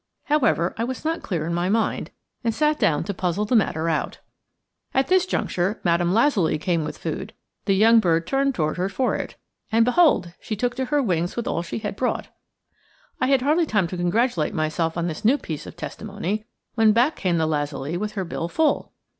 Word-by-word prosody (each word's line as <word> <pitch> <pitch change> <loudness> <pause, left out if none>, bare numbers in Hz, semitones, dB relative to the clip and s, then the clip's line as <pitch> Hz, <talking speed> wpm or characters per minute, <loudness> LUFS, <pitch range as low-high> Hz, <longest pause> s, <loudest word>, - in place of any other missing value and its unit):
However, 245 - +2
I - - +1
was 255 +4 -4
not 325 +1 -1
clear 165 -6 -2
in 170 - -2
my 175 +2 0
mind, 220 +2 0 0.3
and 230 -2 0
sat 300 0 +2
down 150 -2 +2
to 200 - -3
puzzle 185 +2 -1
the 245 - +1
matter 165 -7 +2
out. 160 -2 -1 0.8
At 265 0 +2
this 370 0 +4
juncture 190 - -1
Madame 175 0 +2
Lazuli 210 - +3
came 170 0 0
with - - -5
food; 190 +6 -5 0.3
the 195 - +3
young 225 +3 +6
bird 165 -5 +2
turned 275 +2 +1
toward 155 0 -1
her 185 +2 0
for 250 +6 0
it, - - -5 0.4
and 225 +1 +4
behold! 250 - +3
she 215 - -4
took 245 +4 -1
to 260 - 0
her 290 +1 +1
wings 175 -5 0
with 235 - -3
all 170 - 0
she 170 - -5
had 210 -2 -4
brought. 250 +4 -2 0.9
I 255 - +1
had 270 -2 +3
hardly 310 +4 +2
time 205 -7 +2
to 185 - -5
congratulate 175 0 0
myself 160 +1 -1
on 170 - 0
this 165 +5 -5
new 245 +7 +4
piece 155 - -6
of - - -9
testimony, 210 0 -4 0.3
when 225 -2 +4
back 245 +7 +3
came 180 -3 0
the 160 - +2
lazuli 145 0 -2
with 210 +4 -3
her 195 -3 -3
bill 165 0 -3
full! 310 - 0
205 Hz, 205 wpm, -23 LUFS, 170-245 Hz, 0.9 s, young